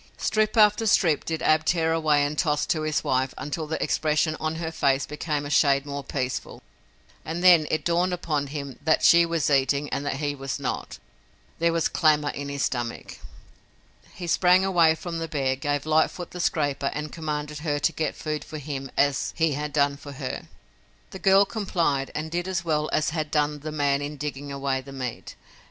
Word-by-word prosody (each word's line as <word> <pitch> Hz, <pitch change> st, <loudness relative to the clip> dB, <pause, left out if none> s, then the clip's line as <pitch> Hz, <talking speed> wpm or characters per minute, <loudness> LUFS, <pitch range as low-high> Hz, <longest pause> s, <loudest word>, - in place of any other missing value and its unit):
Strip 215 Hz, +1 st, 0 dB
after 210 Hz, +1 st, +5 dB
strip 165 Hz, -7 st, +3 dB
did 160 Hz, -1 st, -3 dB
Ab 155 Hz, 0 st, +3 dB
tear 160 Hz, -1 st, +1 dB
away 150 Hz, -3 st, +2 dB
and 145 Hz, +1 st, -3 dB
toss 150 Hz, -2 st, +1 dB
to 155 Hz, -, 0 dB
his 155 Hz, -1 st, -1 dB
wife 130 Hz, 0 st, 0 dB
until 150 Hz, +2 st, -4 dB
the 160 Hz, -, -2 dB
expression 155 Hz, 0 st, +1 dB
on 155 Hz, 0 st, -2 dB
her 160 Hz, 0 st, -4 dB
face 135 Hz, -3 st, +1 dB
became 150 Hz, -1 st, -3 dB
a 145 Hz, -, -5 dB
shade 140 Hz, -2 st, +3 dB
more 140 Hz, -1 st, -5 dB
peaceful 130 Hz, -3 st, -4 dB, 0.6 s
and 165 Hz, +2 st, -4 dB
then 170 Hz, -4 st, +7 dB
it 155 Hz, -, -1 dB
dawned 175 Hz, +2 st, +2 dB
upon 155 Hz, -5 st, -2 dB
him 140 Hz, -2 st, -6 dB
that 155 Hz, +1 st, +2 dB
she 170 Hz, 0 st, +6 dB
was 165 Hz, -3 st, 0 dB
eating 140 Hz, +1 st, +2 dB
and 140 Hz, -, -2 dB
that 145 Hz, -, -2 dB
he 145 Hz, +1 st, -2 dB
was 135 Hz, -2 st, -5 dB
not. -, -, -4 dB, 0.6 s
There 170 Hz, 0 st, +3 dB
was 165 Hz, -1 st, +1 dB
clamor 150 Hz, -2 st, +2 dB
in 140 Hz, 0 st, -6 dB
his 140 Hz, 0 st, -2 dB
stomach. 120 Hz, -2 st, -3 dB, 1.0 s
He 175 Hz, -, -6 dB
sprang 180 Hz, +2 st, +4 dB
away 170 Hz, -4 st, +4 dB
from 165 Hz, 0 st, -5 dB
the 165 Hz, -, -3 dB
bear, 135 Hz, -4 st, 0 dB
gave 145 Hz, +1 st, -2 dB
Lightfoot 160 Hz, +3 st, +1 dB
the 180 Hz, -, -8 dB
scraper 145 Hz, -5 st, 0 dB
and 150 Hz, +1 st, -4 dB
commanded 150 Hz, -2 st, -4 dB
her 150 Hz, -2 st, -1 dB
to 145 Hz, -, +1 dB
get 155 Hz, -, -2 dB
food 155 Hz, -1 st, -4 dB
for 155 Hz, -, -8 dB
him 135 Hz, -2 st, -5 dB
as 140 Hz, -1 st, +1 dB
he 165 Hz, -1 st, +2 dB
had 150 Hz, +1 st, -3 dB
done 140 Hz, -1 st, +1 dB
for 145 Hz, 0 st, -10 dB
her. 135 Hz, -, -5 dB, 0.6 s
The 190 Hz, -, -8 dB
girl 195 Hz, +1 st, +5 dB
complied 170 Hz, -11 st, -1 dB
and 155 Hz, +1 st, -4 dB
did 175 Hz, +1 st, -2 dB
as 175 Hz, -2 st, -2 dB
well 155 Hz, -2 st, 0 dB
as 155 Hz, +1 st, +1 dB
had 155 Hz, -2 st, -2 dB
done 150 Hz, 0 st, 0 dB
the 155 Hz, +2 st, -6 dB
man 145 Hz, -2 st, +1 dB
in 145 Hz, +1 st, -5 dB
digging 145 Hz, 0 st, -5 dB
away 135 Hz, -1 st, -1 dB
the 135 Hz, +1 st, -12 dB
meat. 130 Hz, -3 st, -6 dB
150 Hz, 200 wpm, -25 LUFS, 140-165 Hz, 1.0 s, then